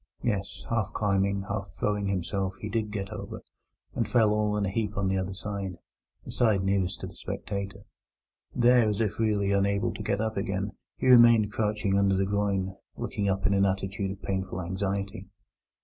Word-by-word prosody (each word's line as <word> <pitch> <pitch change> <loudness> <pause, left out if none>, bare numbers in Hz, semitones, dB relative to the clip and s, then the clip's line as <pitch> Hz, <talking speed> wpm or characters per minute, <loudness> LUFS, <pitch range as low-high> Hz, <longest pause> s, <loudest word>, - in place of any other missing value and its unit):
Yes; 100 -4 -2
half 115 -3 0
climbing, 100 -1 +1
half 100 0 -3
throwing 105 -1 -1
himself, 95 0 -1
he 105 - -5
did 110 0 -1
get 100 -2 -4
over, - - -7 0.5
and - - -1
fell 110 -3 +4
all 105 0 +1
in 100 - +1
a - - -1
heap 105 -1 -2
on 95 0 +1
the 95 - +1
other 95 +1 -3
side 100 -2 -4 0.5
(the - - -7
side 110 -5 +3
nearest 95 -1 0
to - - -3
the - - -8
spectator). 100 0 -5 0.7
There, 120 -2 +5
as 105 - -1
if 110 -2 -1
really 105 -3 +2
unable 100 +3 +1
to - - -7
get 100 -1 0
up 110 -1 -1
again, 100 0 -1 0.3
he - - -1
remained 120 -4 +7
crouching 105 -2 +1
under 100 -1 +3
the 95 +1 +2
groyne, 100 -1 0 0.2
looking 100 -1 -1
up 95 0 -1
in 100 - +4
an 100 0 +3
attitude 95 +1 -1
of 95 +1 -7
painful 95 -1 -2
anxiety. 100 +2 -3
100 Hz, 185 wpm, -28 LUFS, 95-105 Hz, 0.7 s, remained